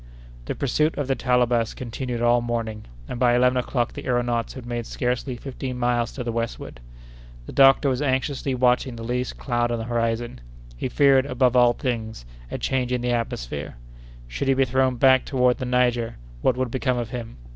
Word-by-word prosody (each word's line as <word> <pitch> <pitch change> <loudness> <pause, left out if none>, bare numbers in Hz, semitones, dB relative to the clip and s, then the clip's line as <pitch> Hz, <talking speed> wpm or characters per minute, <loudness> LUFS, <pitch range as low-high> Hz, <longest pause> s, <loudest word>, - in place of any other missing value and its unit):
The - - -3
pursuit 150 +4 0
of 145 -2 -2
the 135 - +2
Talabas 120 -2 +1
continued 120 0 -4
all 120 0 +4
morning; 115 -2 -3 0.2
and 120 - -5
by 120 -1 +4
eleven 125 +1 +3
o'clock 120 -1 -1
the - - -7
aëronauts 120 -2 -1
had 130 -3 -9
made 120 -1 -4
scarcely 125 +1 -2
fifteen 130 0 -6
miles 120 -1 0
to 125 - -5
the 120 - -2
westward. 115 - -4 0.7
The - - -8
doctor 135 +1 +5
was 130 -1 0
anxiously 135 -1 -1
watching 125 0 +2
for 115 -1 -8
the - - -6
least 125 +1 -2
cloud 120 -2 -1
on 120 - 0
the 115 - -4
horizon. 115 - -2 0.3
He - - -3
feared, 135 0 +4
above 125 -1 +2
all 120 -1 +6
things, 110 - -4 0.2
a - - -4
change 130 -2 -1
in 125 -1 0
the 125 0 0
atmosphere. 75 - -3 0.5
Should 95 - -4
he 135 - +4
be 135 0 +3
thrown 130 0 +1
back 130 +1 +5
toward 125 -2 +1
the 130 - -3
Niger, 120 -2 +1 0.3
what 125 - +2
would 130 -2 -1
become 130 -1 0
of 120 -2 -3
him? 115 -2 -6
125 Hz, 195 wpm, -24 LUFS, 120-130 Hz, 0.7 s, all